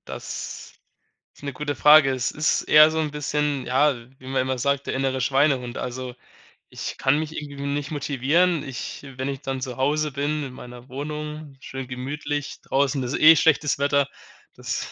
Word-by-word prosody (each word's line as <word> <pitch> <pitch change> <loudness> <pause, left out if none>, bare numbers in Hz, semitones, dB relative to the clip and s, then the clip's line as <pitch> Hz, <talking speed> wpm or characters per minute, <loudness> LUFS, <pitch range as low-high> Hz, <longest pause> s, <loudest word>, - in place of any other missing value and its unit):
Das - - -7 0.6
ist - - -20
'ne 140 -1 -4
gute 145 +2 -3
Frage. 150 0 +7
Es 130 -1 -1
ist 155 +1 +1
eher 155 +1 +7
so 160 - -2
'n 155 -2 -1
bisschen, 150 -2 -1
ja- 140 +3 +3 0.3
wie 130 - -13
man 130 -1 0
immer 130 0 -2
sagt- 140 +2 0
der - - -2
innere 130 0 -1
Schweinehund. 135 -2 +1
Also, 125 0 -5 0.6
ich - - -6
kann 135 +2 +3
mich 155 0 -4
irgendwie 140 -1 -7
nicht 145 +2 -2
motivieren. 150 +5 +1
Ich 130 0 -6
wenn 130 +1 -3
ich 135 -1 -4
dann 135 -1 -3
zu 125 -2 -5
Hause 150 +2 0
bin, 145 +2 -1
in 130 - -7
meiner 125 +1 -11
Wohnung, 150 +1 -6
schön 135 -1 -7
gemütlich, 145 +3 -4
draußen 135 0 0
ist 125 - -2
eh 160 +1 +8
schlechtes 150 -2 +3
Wetter, 140 0 +2 0.5
das - - -4
140 Hz, 175 wpm, -24 LUFS, 130-150 Hz, 0.6 s, eh